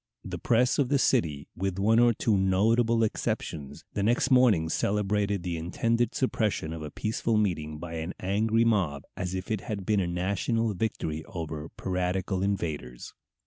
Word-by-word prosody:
The -, -, -5 dB
press 125 Hz, +3 st, +2 dB
of 135 Hz, -3 st, +2 dB
the 145 Hz, -, +3 dB
city, 80 Hz, -, +1 dB
with 95 Hz, 0 st, -2 dB
one 110 Hz, +4 st, +4 dB
or 120 Hz, 0 st, +6 dB
two 110 Hz, -1 st, +1 dB
notable 115 Hz, +5 st, +3 dB
exceptions, 75 Hz, -8 st, -3 dB
the -, -, -1 dB
next 120 Hz, +5 st, +2 dB
morning 120 Hz, -11 st, +5 dB
celebrated 100 Hz, +1 st, 0 dB
the 85 Hz, -2 st, -2 dB
intended 115 Hz, +8 st, 0 dB
suppression 105 Hz, -10 st, 0 dB
of 80 Hz, -, -6 dB
a 75 Hz, -, -5 dB
peaceful 110 Hz, +5 st, -1 dB
meeting 80 Hz, -7 st, -1 dB
by 85 Hz, +1 st, -7 dB
an 80 Hz, +3 st, -4 dB
angry 110 Hz, +4 st, +2 dB
mob 90 Hz, -11 st, +1 dB
as 90 Hz, 0 st, -3 dB
if 95 Hz, +3 st, -5 dB
it 110 Hz, -3 st, -1 dB
had 100 Hz, -2 st, -5 dB
been 105 Hz, -2 st, +2 dB
a 90 Hz, -, 0 dB
national 100 Hz, +6 st, 0 dB
victory 80 Hz, -6 st, -2 dB
over 80 Hz, -2 st, -6 dB
piratical 90 Hz, +1 st, -1 dB
invaders. 80 Hz, -11 st, -3 dB
95 Hz, 165 wpm, -28 LUFS, 85-110 Hz, -, or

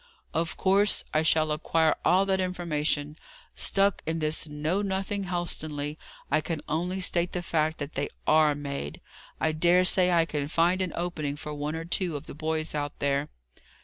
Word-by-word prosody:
"Of 165 Hz, +1 st, -1 dB
course, 200 Hz, +2 st, +3 dB
I 155 Hz, -, +3 dB
shall 155 Hz, -1 st, +3 dB
acquire 160 Hz, +1 st, +2 dB
all 190 Hz, +2 st, +4 dB
that 190 Hz, -1 st, +1 dB
information. 155 Hz, -4 st, -1 dB, 0.3 s
Stuck 195 Hz, 0 st, +1 dB
in 160 Hz, +1 st, 0 dB
this 155 Hz, 0 st, +1 dB
know 155 Hz, +6 st, -1 dB
nothing 195 Hz, 0 st, -2 dB
Helstonleigh, 155 Hz, -5 st, -3 dB, 0.4 s
I 155 Hz, +2 st, +3 dB
can 160 Hz, 0 st, -3 dB
only 180 Hz, +5 st, -1 dB
state 175 Hz, -1 st, 0 dB
the 180 Hz, -, -2 dB
fact 160 Hz, -1 st, 0 dB
that 145 Hz, +1 st, -5 dB
they 140 Hz, -, -2 dB, 0.2 s
are 155 Hz, -1 st, +5 dB
made. 140 Hz, -, -5 dB, 0.4 s
I 160 Hz, -, +2 dB
dare 175 Hz, +3 st, +4 dB
say 180 Hz, 0 st, +4 dB
I 170 Hz, -2 st, +4 dB
can 150 Hz, -3 st, -3 dB
find 175 Hz, +4 st, +2 dB
an 185 Hz, -2 st, -1 dB
opening 155 Hz, -5 st, -2 dB
for 150 Hz, 0 st, -6 dB
one 150 Hz, +1 st, -3 dB
or 165 Hz, 0 st, -4 dB
two 170 Hz, -1 st, 0 dB
of 145 Hz, -, -6 dB
the -, -, -9 dB
boys 155 Hz, +1 st, -2 dB
out 145 Hz, -1 st, -3 dB
there." 140 Hz, +1 st, 0 dB
160 Hz, 180 wpm, -28 LUFS, 150-180 Hz, 0.4 s, are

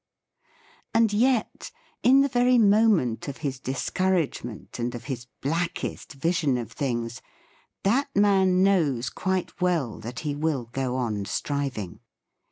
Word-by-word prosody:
H: -, -, -37 dB, 0.5 s
And 225 Hz, -2 st, +4 dB
yet, 240 Hz, +1 st, +1 dB, 0.3 s
in 270 Hz, +2 st, +6 dB
the 280 Hz, -, +3 dB
very 250 Hz, -1 st, +3 dB
moment 205 Hz, -, +3 dB
of 140 Hz, -, -5 dB
his 135 Hz, -2 st, -2 dB
discouragement 135 Hz, -, -2 dB
and 120 Hz, +1 st, -2 dB
of 120 Hz, -, -7 dB
his 125 Hz, -3 st, -5 dB
blackest 165 Hz, +3 st, -3 dB
vision 150 Hz, -2 st, +1 dB
of 115 Hz, -3 st, -5 dB
things, 120 Hz, -4 st, -3 dB, 0.6 s
that 245 Hz, +8 st, +2 dB
man 190 Hz, -2 st, +4 dB
knows 150 Hz, -11 st, +2 dB
quite 190 Hz, 0 st, -2 dB
well 170 Hz, -10 st, 0 dB
that 115 Hz, +3 st, -6 dB
he 150 Hz, -2 st, -2 dB
will 145 Hz, -4 st, -1 dB
go 130 Hz, -2 st, -1 dB
on 110 Hz, -6 st, -2 dB
striving. 135 Hz, -8 st, -3 dB
150 Hz, 135 wpm, -26 LUFS, 125-195 Hz, 0.6 s, in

